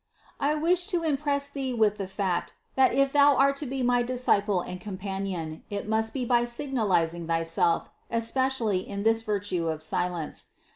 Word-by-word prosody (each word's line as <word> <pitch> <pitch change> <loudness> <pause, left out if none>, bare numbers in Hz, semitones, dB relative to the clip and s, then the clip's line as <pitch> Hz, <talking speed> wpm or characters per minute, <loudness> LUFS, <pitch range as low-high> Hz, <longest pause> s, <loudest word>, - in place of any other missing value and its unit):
I 290 +2 +1
wish 350 +3 +2
to 350 -5 0
impress 285 -2 0
thee 270 -3 -3
with 215 -2 +2
the 195 - -3
fact, 190 -2 -2 0.2
that 265 -1 +5
if 275 0 +2
thou 285 -1 +6
art 275 +1 +4
to 290 - -3
be 265 0 -2
my 245 0 +3
disciple 225 -6 +1
and 180 +1 -7
companion, 190 -5 -5
it 205 0 -4
must 220 +1 0
be 255 -3 -3
by 240 0 +3
signalizing 210 - 0
thyself 165 0 0 0.2
especially 230 -3 +1
in 200 +2 -5
this 225 +1 +3
virtue 200 -5 -2
of 155 -1 -3
silence. 170 0 -3
225 Hz, 165 wpm, -27 LUFS, 185-270 Hz, 0.2 s, thou